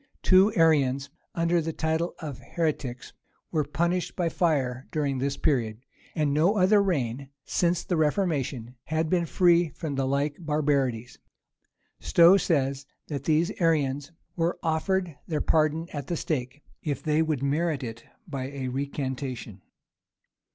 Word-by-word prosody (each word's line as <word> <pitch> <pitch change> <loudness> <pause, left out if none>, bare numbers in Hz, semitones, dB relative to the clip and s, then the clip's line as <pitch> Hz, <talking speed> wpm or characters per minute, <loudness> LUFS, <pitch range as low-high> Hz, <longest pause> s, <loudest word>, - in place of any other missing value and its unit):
Two 190 +3 +6
Arians, 140 -5 +3 0.2
under 170 0 +2
the 165 +1 -3
title 160 +3 -1
of 150 -6 -7
heretics, 140 -7 -3 0.4
were 155 -3 +1
punished 170 +5 -1
by 175 -3 0
fire 135 -8 0
during 140 -4 -1
this 140 +1 -1
period; 115 -8 0 0.4
and 150 -3 +1
no 170 +8 +3
other 200 +2 +5
reign, 135 -8 -1 0.2
since 175 -1 +1
the 180 - -1
reformation, 150 - 0
had 160 0 -1
been 175 -2 +2
free 175 0 +4
from 155 -2 -5
the 135 -1 0
like 140 +2 0
barbarities. 140 -7 -1 0.8
Stowe 170 +3 +6
says, 140 -6 0 0.2
that 140 -3 -4
these 160 +2 +2
Arians 145 -3 +1 0.2
were 170 0 0
offered 170 +1 0
their 155 -3 -1
pardon 155 +1 +1
at 145 -3 -5
the 170 - -2
stake, 140 -2 -3 0.2
if 145 -3 -3
they 155 0 +2
would 155 -4 -1
merit 145 0 0
it 115 -1 -7 0.2
by 135 -5 -4
a 135 -2 -4
recantation. 130 -5 -4
150 Hz, 140 wpm, -27 LUFS, 135-170 Hz, 0.8 s, Two